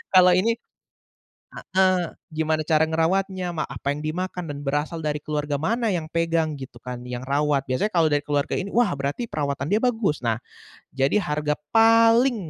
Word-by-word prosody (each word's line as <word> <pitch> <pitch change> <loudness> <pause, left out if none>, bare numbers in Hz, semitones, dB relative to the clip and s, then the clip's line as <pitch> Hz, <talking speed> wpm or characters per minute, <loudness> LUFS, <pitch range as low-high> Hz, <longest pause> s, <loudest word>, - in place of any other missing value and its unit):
Kalau 180 0 +8
ini 215 +6 +3 1.0
heeh. 185 -1 +2 0.3
Gimana 155 0 0
cara 155 0 +2
ngerawatnya, 180 +3 0
ma 160 -3 -3
apa 140 - -4
yang 150 +2 -4
dimakan, 180 +2 -3
dan 145 -2 -6
berasal 145 +4 -2
dari 150 -1 -1
keluarga 150 -1 -2
mana 225 - 0
yang 170 -5 -2
pegang 165 -1 0
gitu 130 -3 -9
kan, 125 0 -7
yang 125 +1 -6
rawat. 140 0 +1
Biasanya 130 +12 0
kalau 170 -5 +3
dari 145 -2 +1
keluarga 145 -1 -1
ini, 200 +1 -3
“Wah, 230 -6 +2
berarti 140 - -3
perawatan 140 - -3
dia 210 +7 +1
bagus.” 225 - 0
Nah, 115 -2 0 0.5
jadi 135 +7 +1
harga 150 -2 -1 0.2
paling 230 +2 +5
155 Hz, 170 wpm, -24 LUFS, 145-185 Hz, 1.0 s, Kalau